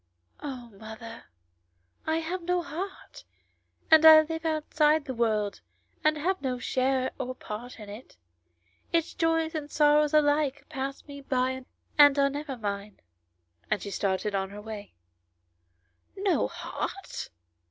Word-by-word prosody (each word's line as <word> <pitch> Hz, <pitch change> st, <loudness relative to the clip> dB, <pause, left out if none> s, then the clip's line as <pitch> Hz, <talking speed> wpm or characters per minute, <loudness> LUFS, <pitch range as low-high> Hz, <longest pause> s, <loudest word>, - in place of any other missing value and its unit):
" -, -, -43 dB
Oh, 245 Hz, -3 st, -9 dB
mother, 225 Hz, +1 st, -9 dB, 0.8 s
I 320 Hz, +1 st, +1 dB
have 355 Hz, +3 st, -3 dB
no 355 Hz, +1 st, 0 dB
heart, 355 Hz, +6 st, -7 dB, 0.7 s
and 315 Hz, 0 st, +8 dB
I 315 Hz, -1 st, +11 dB
live 320 Hz, +1 st, -5 dB
outside 310 Hz, -1 st, +2 dB
the 265 Hz, -, -4 dB
world 215 Hz, -4 st, 0 dB, 0.4 s
and 310 Hz, 0 st, +3 dB
have 370 Hz, +5 st, -1 dB
no 255 Hz, -2 st, -1 dB
share 260 Hz, +1 st, 0 dB
or 255 Hz, 0 st, -3 dB
part 240 Hz, +2 st, -8 dB
in 210 Hz, -, -9 dB
it; 210 Hz, +5 st, -11 dB, 0.7 s
its 335 Hz, -1 st, +1 dB
joys 325 Hz, -1 st, +1 dB
and 300 Hz, -2 st, -4 dB
sorrows 300 Hz, 0 st, +4 dB
alike 290 Hz, -1 st, +2 dB
pass 270 Hz, +1 st, -5 dB
me 280 Hz, -1 st, -9 dB
by 260 Hz, -1 st, -1 dB, 0.3 s
and 290 Hz, -1 st, +8 dB
are 275 Hz, 0 st, +3 dB
never 285 Hz, -2 st, -5 dB
mine 205 Hz, -1 st, -5 dB, 0.3 s
;" 85 Hz, 0 st, -41 dB
and -, -, +1 dB
she 200 Hz, -, -5 dB
started 195 Hz, +2 st, -1 dB
on 190 Hz, -1 st, -1 dB
her 205 Hz, +1 st, -9 dB
way. 210 Hz, -1 st, -8 dB, 1.2 s
"No 390 Hz, -1 st, +2 dB
heart 390 Hz, -, -5 dB
275 Hz, 140 wpm, -28 LUFS, 220-310 Hz, 1.2 s, I